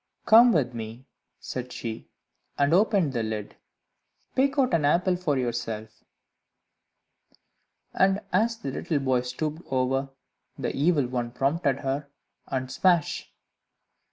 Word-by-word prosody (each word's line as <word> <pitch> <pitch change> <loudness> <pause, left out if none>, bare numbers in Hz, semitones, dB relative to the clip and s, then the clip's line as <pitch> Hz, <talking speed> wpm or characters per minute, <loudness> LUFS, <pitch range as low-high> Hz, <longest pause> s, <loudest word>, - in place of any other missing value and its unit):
"Come 235 +2 +8
with 130 - +1
me," 115 +2 -7 0.3
said 125 0 -6
she, 110 -1 -6 0.5
and 140 +2 +2
opened 195 -6 +3
the 120 - 0
lid; 110 -2 -4 0.8
"pick 270 +2 +1
out 260 -7 +2
an 165 -3 +3
apple 180 +5 +3
for 170 -6 -1
yourself." 115 -3 -4 1.9
And 195 +1 +3
as 230 +5 +2
the 140 -11 -5
little 155 +3 -2
boy 130 -3 +1
stooped 150 +6 -4
over, 135 +1 0 0.5
the - - -3
Evil 150 -1 +2
One 120 -1 -2
prompted 135 +2 0
her, 140 +1 -2 0.4
and 130 -1 -3
smash! 175 -5 +1
140 Hz, 125 wpm, -26 LUFS, 125-175 Hz, 1.9 s, Come